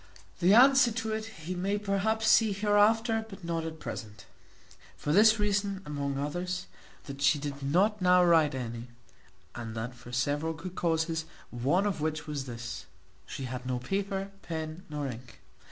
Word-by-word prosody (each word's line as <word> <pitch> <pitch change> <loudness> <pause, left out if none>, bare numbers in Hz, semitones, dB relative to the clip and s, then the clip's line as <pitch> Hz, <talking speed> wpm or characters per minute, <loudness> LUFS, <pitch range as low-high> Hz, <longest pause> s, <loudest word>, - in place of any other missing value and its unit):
The 185 +4 +5
answer 260 0 +7
to 220 -1 -3
it 220 0 -3
he 180 -5 -7
may 195 +3 -1
perhaps 210 +2 0
see 220 -1 +5
hereafter, 215 +3 +3
but 195 -2 -11
not 165 -1 -2
at 160 0 -6
present: 105 -6 -7 0.7
for 150 - -1
this 215 +4 +6
reason, 200 -2 0
among 140 -2 -3
others, 175 +6 -3 0.4
that 140 0 -8
she 140 +2 +4
did 140 -1 -5
not 190 +9 +2
now 180 0 +5
write 160 -4 +4
any, 120 -2 -5 0.7
and 115 -2 -6
that 115 +3 -4
for 120 0 -13
several 145 +6 0
good 170 +3 -8
causes, 160 -2 0 0.3
one 140 +11 +1
of 195 -7 -1
which 155 0 -2
was 145 -3 -4
this, 120 -2 -7 0.4
she 135 - -6
had 125 0 -5
no 130 -1 -1
paper, 195 +7 -3
pen, 160 0 -5
nor 150 -1 -3
ink. 120 -2 -9
165 Hz, 165 wpm, -29 LUFS, 140-200 Hz, 0.7 s, answer